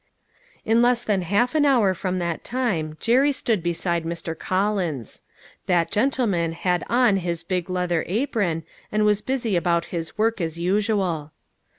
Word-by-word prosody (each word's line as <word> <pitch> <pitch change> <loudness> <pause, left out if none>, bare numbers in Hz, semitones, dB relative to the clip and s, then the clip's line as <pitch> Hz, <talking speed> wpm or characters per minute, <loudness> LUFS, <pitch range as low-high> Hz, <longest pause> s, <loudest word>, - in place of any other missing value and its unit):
In 225 +2 +3
less 240 0 +3
than 205 -4 +1
half 205 - +1
an 310 -2 +3
hour 240 -9 +4
from 185 +1 -3
that 170 -2 -3
time 190 -12 -2
Jerry 260 - +3
stood 225 -7 0
beside 170 0 -1
Mr. 165 0 -4
Collins. 185 - -2 0.5
That 175 -2 +2
gentleman 210 -8 +1
had 180 +1 0
on 235 -4 +4
his 170 -2 -3
big 180 0 -2
leather 180 -2 0
apron, 195 - -1 0.3
and 210 0 +2
was 210 0 +3
busy 240 -6 -1
about 170 -1 +1
his 165 -2 -4
work 220 -2 +1
as 165 -1 -3
usual. 185 -4 0
185 Hz, 155 wpm, -23 LUFS, 170-225 Hz, 0.5 s, hour